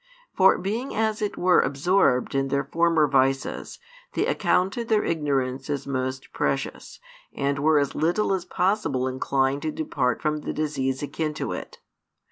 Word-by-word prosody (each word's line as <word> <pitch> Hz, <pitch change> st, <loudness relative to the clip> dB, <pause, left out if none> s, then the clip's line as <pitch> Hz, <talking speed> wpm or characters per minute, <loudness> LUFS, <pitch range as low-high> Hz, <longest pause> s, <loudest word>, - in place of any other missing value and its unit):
For 190 Hz, -1 st, +5 dB
being 225 Hz, +8 st, -3 dB
as 220 Hz, 0 st, 0 dB
it 210 Hz, -, -2 dB
were 180 Hz, 0 st, +4 dB
absorbed 140 Hz, -2 st, +2 dB
in 135 Hz, 0 st, +1 dB
their 140 Hz, +1 st, 0 dB
former 165 Hz, +1 st, +2 dB
vices, 135 Hz, 0 st, 0 dB, 0.4 s
they -, -, +1 dB
accounted 195 Hz, +6 st, +1 dB
their 215 Hz, -2 st, +2 dB
ignorance 135 Hz, -5 st, -1 dB
as 140 Hz, -2 st, -2 dB
most 130 Hz, -1 st, -3 dB
precious, 135 Hz, 0 st, -3 dB, 0.3 s
and 140 Hz, 0 st, -1 dB
were 155 Hz, +1 st, +4 dB
as 140 Hz, -2 st, +1 dB
little 175 Hz, +5 st, +1 dB
as 190 Hz, -2 st, -1 dB
possible 180 Hz, -12 st, 0 dB
inclined 135 Hz, +1 st, 0 dB
to 155 Hz, -, -2 dB
depart 135 Hz, -6 st, -1 dB
from 155 Hz, 0 st, 0 dB
the 150 Hz, -, -5 dB
disease 135 Hz, -3 st, -2 dB
akin 155 Hz, +1 st, -3 dB
to -, -, -3 dB
it. -, -, -6 dB
150 Hz, 155 wpm, -25 LUFS, 135-180 Hz, 0.4 s, For